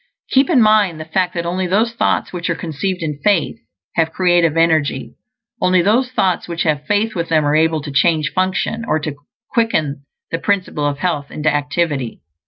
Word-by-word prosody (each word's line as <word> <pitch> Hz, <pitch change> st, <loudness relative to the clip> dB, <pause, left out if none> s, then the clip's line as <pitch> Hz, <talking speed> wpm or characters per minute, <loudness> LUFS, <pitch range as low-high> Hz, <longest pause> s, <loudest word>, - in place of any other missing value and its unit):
Keep 270 Hz, +1 st, +4 dB
in 265 Hz, -9 st, +5 dB
mind 210 Hz, -6 st, +3 dB
the 155 Hz, -, -6 dB
fact 180 Hz, +3 st, -1 dB
that 170 Hz, 0 st, -2 dB
only 180 Hz, +2 st, -1 dB
those 220 Hz, +6 st, +1 dB
thoughts 230 Hz, -, 0 dB
which 175 Hz, 0 st, -3 dB
are 165 Hz, -, 0 dB
conceived 170 Hz, +3 st, -3 dB
in 150 Hz, -2 st, -3 dB
faith 200 Hz, -7 st, +2 dB, 0.4 s
have 165 Hz, -1 st, +1 dB
creative 175 Hz, -3 st, +2 dB
energy. 160 Hz, -5 st, +1 dB, 0.5 s
Only 185 Hz, -1 st, +3 dB
those 240 Hz, +7 st, +2 dB
thoughts 190 Hz, -7 st, 0 dB
which 170 Hz, -1 st, -2 dB
have 150 Hz, -2 st, -1 dB
faith 215 Hz, +2 st, +1 dB
with 170 Hz, -1 st, -3 dB
them 155 Hz, -2 st, +2 dB
are 145 Hz, +1 st, +2 dB
able 160 Hz, -1 st, +2 dB
to 145 Hz, -, -6 dB
change 155 Hz, +3 st, +2 dB
function, 190 Hz, +4 st, -1 dB
or 230 Hz, -, 0 dB
to 150 Hz, -1 st, -4 dB, 0.4 s
quicken 155 Hz, -, 0 dB, 0.3 s
the 165 Hz, -, -1 dB
Principle 185 Hz, -7 st, -1 dB
of 145 Hz, -1 st, -2 dB
Health 150 Hz, -4 st, -2 dB
into 155 Hz, 0 st, 0 dB
activity. 145 Hz, -4 st, -2 dB
170 Hz, 190 wpm, -18 LUFS, 155-190 Hz, 0.5 s, in